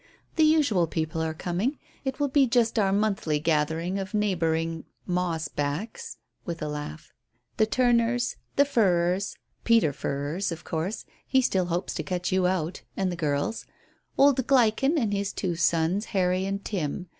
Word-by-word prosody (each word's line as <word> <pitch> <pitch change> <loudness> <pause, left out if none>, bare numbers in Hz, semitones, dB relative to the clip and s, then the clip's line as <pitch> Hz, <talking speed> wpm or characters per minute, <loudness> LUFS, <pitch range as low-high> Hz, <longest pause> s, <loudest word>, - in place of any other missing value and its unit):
"The 320 - +4
usual 285 - +4
people 160 0 -2
are 160 0 -2
coming. 185 - -1 0.3
It 265 - -3
will 290 - +2
be 275 0 +4
just 230 -1 +2
our 195 -2 +3
monthly 200 -7 +1
gathering 160 +4 0
of 190 +1 -4
neighbouring 165 -5 0 0.2
moss 175 -3 -1
backs," 205 - -4 0.3
with 170 -1 -5
a - - -2
laugh. 150 - -6 0.4
"The 215 - +3
Turners, 240 0 +2 0.2
the 285 - +5
Furrers 190 -6 +1 0.3
Peter 225 -11 +4
Furrers, 145 +7 -2
of 165 +1 -6
course; 170 +6 -3 0.2
he 265 - +4
still 190 -7 +1
hopes 175 +1 -2
to - - -3
cut 180 -1 -2
you 185 -1 +3
out 180 -2 -2 0.2
and 190 -2 0
the - - -3
girls; 150 +5 -2 0.5
old 275 -3 +4
Gleichen 270 +3 +3
and 220 -8 +1
his 200 0 -1
two 180 -3 -2
sons, 170 +5 +1
Harry 185 -2 +1
and 200 0 -3
Tim. 180 -3 -3
185 Hz, 160 wpm, -26 LUFS, 165-230 Hz, 0.5 s, the